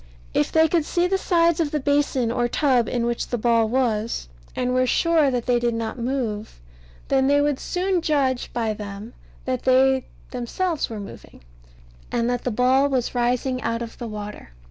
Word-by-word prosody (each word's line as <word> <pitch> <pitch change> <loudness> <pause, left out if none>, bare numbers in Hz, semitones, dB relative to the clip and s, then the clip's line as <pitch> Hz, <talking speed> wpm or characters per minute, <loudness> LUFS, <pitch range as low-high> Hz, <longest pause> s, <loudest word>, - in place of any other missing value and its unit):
If - - +1
they 320 0 +5
could 330 0 +1
see 345 +3 0
the 385 +1 +1
sides 340 -3 +2
of 320 -3 +1
the 300 - -1
basin 280 -4 +1
or 240 0 +1
tub 250 -2 +2
in 240 -2 -1
which 235 0 -2
the 245 - -2
ball 230 -1 +2
was, 230 - -1 0.3
and 250 0 -1
were 255 0 +2
sure 325 0 +3
that 245 -3 -2
they 245 -1 +2
did 240 -1 0
not 230 +2 -4
move, 230 - -3 0.5
then 265 -1 +3
they 285 +1 +4
would 290 -2 +1
soon 365 0 -1
judge 275 -6 0
by 225 -2 -1
them 205 +2 -8 0.3
that 255 -1 -1
they 260 0 +3 0.2
themselves 310 +7 -2
were 220 -2 -6
moving, 200 - -11 0.7
and 235 0 0
that 245 -1 -3
the - - +1
ball 255 +4 +3
was 255 -3 -1
rising 250 +1 0
out 230 +1 -2
of 230 - -10
the 235 - -5
water. 210 - -8
250 Hz, 190 wpm, -23 LUFS, 235-285 Hz, 0.7 s, they